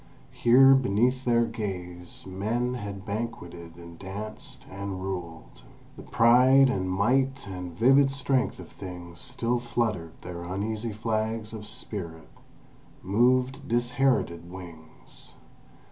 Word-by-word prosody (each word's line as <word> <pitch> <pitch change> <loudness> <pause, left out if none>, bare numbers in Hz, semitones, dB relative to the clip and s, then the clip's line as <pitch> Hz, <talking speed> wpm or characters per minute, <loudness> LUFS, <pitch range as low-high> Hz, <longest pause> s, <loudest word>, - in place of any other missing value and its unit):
Here, 135 +3 +6
beneath 125 +1 +2
their 120 -1 +3
gaze, 90 -6 -5
men 110 +6 -1
had 100 -5 -6
banqueted 90 -6 -5
and 85 -1 -12
danced 105 +3 -7
and 100 -1 -5
ruled. 85 -9 -6 0.3
The - - -10
pride 130 +3 +5
and 95 -5 -1
might 130 +8 +1
and 90 -3 -7
vivid 135 +5 +5
strength 135 -1 0
of - - -10
things 90 -2 -9
still 125 -1 -1
fluttered 110 -8 -2
their 85 -1 -7
uneasy 105 +5 -3
flags 110 +1 -2
of 105 -1 -7
spirit, 85 -6 -6 0.7
moved 130 +7 +2
disherited 120 -8 +1
wings! 85 -4 -12
105 Hz, 115 wpm, -27 LUFS, 90-125 Hz, 0.7 s, Here